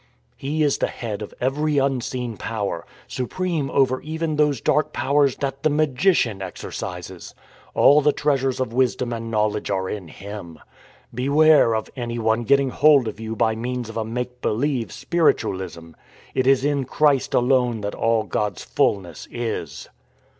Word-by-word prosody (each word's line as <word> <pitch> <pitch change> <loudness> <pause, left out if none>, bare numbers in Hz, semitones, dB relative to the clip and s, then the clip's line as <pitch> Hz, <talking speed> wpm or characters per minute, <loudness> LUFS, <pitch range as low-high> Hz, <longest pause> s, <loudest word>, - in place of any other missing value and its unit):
" - - -41
He 150 +3 -1
is 145 -2 +1
the - - +1
Head 110 -3 -5
of 105 - -6
every 145 +4 0
unseen 130 -3 -1
Power, 110 -1 -4 0.2
supreme 155 +2 -2
over 130 -1 +2
even 160 0 -3
those 150 -4 +2
dark 150 +5 +1
powers 140 -1 +2
that 135 -1 -4
the 155 - +3
magician 145 - +2
exer 95 -2 -7
cises. 90 0 -7 0.4
All 145 +2 +6
the 150 +1 +4
treasures 135 -3 0
of 130 -3 -2
wisdom 125 -1 +1
and 115 0 -5
knowledge 105 -1 0
are 95 -2 -1
in 95 -3 -5
Him. 95 -2 -9 0.6
Beware 140 0 +4
of 110 - -3
anyone 120 -2 -1
getting 140 +1 +3
hold 145 -5 +5
of 110 - -5
you 110 0 -5
by 110 0 +2
means 120 0 -4
of 115 - -7
a 110 - 0
make 125 +2 -5
believe 125 +1 -1
spiritualism. 95 - -1 0.4
It 130 - 0
is 135 0 +4
in 145 -2 0
Christ 140 0 +2
alone 125 -3 +2
that 105 0 -3
all 115 -1 +1
God's 100 -1 -2
fullness 90 -6 -1
is. 80 - -4
125 Hz, 160 wpm, -22 LUFS, 110-140 Hz, 0.6 s, All